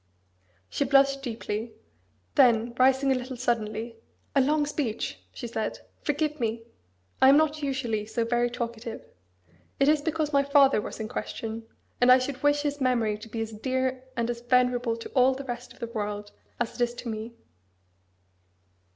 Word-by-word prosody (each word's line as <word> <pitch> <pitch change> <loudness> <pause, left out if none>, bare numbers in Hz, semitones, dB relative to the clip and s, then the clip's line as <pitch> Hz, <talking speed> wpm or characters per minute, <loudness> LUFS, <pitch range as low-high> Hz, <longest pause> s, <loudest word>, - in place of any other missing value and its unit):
She - - -1
blushed 275 0 +4
deeply: 225 -2 -4 0.6
then 235 - +4
rising 265 +1 +4
a - - +4
little 255 0 -5
suddenly, 230 -1 -2 0.4
"A 275 - +6
long 295 +2 +2
speech!" 275 -7 -3
she 245 - -7
said: 225 -2 -3 0.2
"Forgive 300 0 -1
me! 230 -1 -1 0.6
I 265 - +8
am 280 - +7
not 310 0 +2
usually 240 -7 -2
so 230 +1 -1
very 240 +1 +1
talkative. 235 -1 -5 0.7
It 275 - +4
is 300 0 +4
because 310 -1 -1
my 280 0 +4
father 280 -5 +5
was - - -7
in 220 - -3
question; 225 +1 -5 0.3
and 250 +1 +7
I 255 - +9
should 255 +1 -3
wish 290 0 +3
his 290 -1 -2
memory 235 -5 +2
to 225 - -11
be 225 +1 -4
as 225 0 -4
dear 260 +3 -2
and 235 0 +1
as 235 0 -6
venerable 245 -1 +2
to 230 - -8
all 260 0 +4
the 275 +1 -7
rest 245 -1 -6
of - - -15
the - - -4
world 210 -2 -4 0.3
as 240 -1 -1
it 245 - 0
is 240 0 -1
to 240 - -8
me." 220 +1 -5
245 Hz, 175 wpm, -27 LUFS, 230-275 Hz, 0.7 s, I